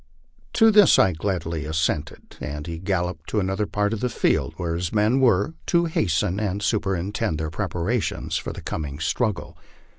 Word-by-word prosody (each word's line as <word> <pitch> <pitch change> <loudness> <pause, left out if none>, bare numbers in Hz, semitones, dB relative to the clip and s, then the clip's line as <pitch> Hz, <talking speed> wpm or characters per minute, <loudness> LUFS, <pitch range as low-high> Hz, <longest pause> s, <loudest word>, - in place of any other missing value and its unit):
" - - -37
To 225 0 +6
this 210 -3 +7
I 95 - +4
gladly 85 -2 -2
assented, 80 0 -2
and 75 0 -5
he 85 -1 -5
galloped 90 -3 -2
to 110 - +1
another 95 +2 -1
part 105 +1 0
of 110 - -3
the 125 - 0
field, - - 0
where 85 -2 -2
his 85 0 -2
men 110 +5 +2
were, 120 - +3
to 170 -1 +3
hasten 100 - 0
and 100 -1 -2
superintend 100 -2 -1
their 80 0 -3
preparations 90 +9 -2
for - - -2
the - - -8
coming 70 -3 -4
struggle. 90 - -2
95 Hz, 175 wpm, -24 LUFS, 80-105 Hz, -, this